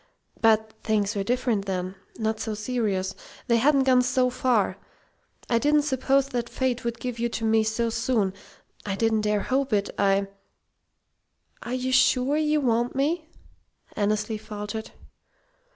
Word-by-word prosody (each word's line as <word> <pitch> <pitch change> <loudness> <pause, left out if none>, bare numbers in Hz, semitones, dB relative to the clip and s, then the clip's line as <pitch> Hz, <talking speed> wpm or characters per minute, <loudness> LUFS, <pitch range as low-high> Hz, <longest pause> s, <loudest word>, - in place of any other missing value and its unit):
But 220 -1 +3
things 210 -1 0
were 200 - 0
different 235 -2 0
then 185 -1 -3 0.2
not 220 -1 -1
so 220 -2 -3
serious. 210 -4 -1 0.3
They 235 -2 +3
hadn't 275 +3 +4
gone 255 -1 +5
so 250 0 +1
far. 245 -5 +1 0.7
I 235 - +2
didn't 295 +2 +3
suppose 275 -1 +1
that 240 -2 -3
Fate 255 -2 -1
would 235 0 -3
give 250 -2 -4
you 235 0 0
to 225 -1 -3
me 220 0 +3
so 225 +1 -1
soon. 225 -4 0 0.5
I 195 -2 -2
didn't 220 +1 +1
dare 210 -1 +1
hope 270 +3 0
it. 200 -1 +1
I 195 0 +3 0.7
" - - -44
"Are 245 - -4
you 255 0 -2
sure 260 +1 +3
you 305 0 +2
want 240 -1 +1
me?" 315 +4 0 0.7
Annesley 215 +1 0
faltered. 210 +1 -6
230 Hz, 150 wpm, -25 LUFS, 210-255 Hz, 0.7 s, gone